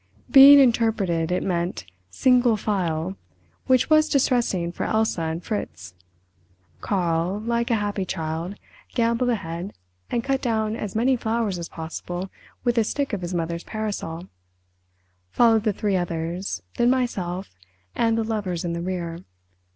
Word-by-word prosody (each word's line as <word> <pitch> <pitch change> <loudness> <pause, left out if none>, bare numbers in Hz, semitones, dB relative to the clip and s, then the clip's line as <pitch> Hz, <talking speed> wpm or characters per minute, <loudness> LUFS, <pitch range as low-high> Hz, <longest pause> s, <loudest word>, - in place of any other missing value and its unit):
Being 280 +1 +10
interpreted, 220 - +2
it 180 - 0
meant 175 - -2 0.2
"single 245 - +3
file", 185 -3 -2 0.5
which 255 -2 +4
was 310 0 +4
distressing 240 -10 +1
for - - -4
Elsa 220 -5 0
and 165 +1 -3
Fritz. 90 - -5 0.9
Karl, 175 - 0
like 235 +1 -1
a 230 - +3
happy 205 -2 -1
child, 165 +2 -4 0.4
gambolled 235 +1 +1
ahead, 180 -4 -3 0.3
and 235 - -1
cut 270 0 0
down 220 -3 0
as 210 -3 -5
many 250 +4 +3
flowers 225 -5 -1
as 170 - -6
possible 175 +3 -6 0.3
with 240 - +2
the 230 - +5
stick 275 +3 -2
of 200 - -2
his 175 +1 -4
mother's 170 0 -2
parasol—followed 90 - -3
the 215 - +2
three 200 -1 0
others—then 170 - -2
myself—and 180 - -2
the 225 - +1
lovers 200 -6 -3
in 170 - -2
the 170 - -3
rear. 175 -2 -4
190 Hz, 135 wpm, -24 LUFS, 165-230 Hz, 0.9 s, Being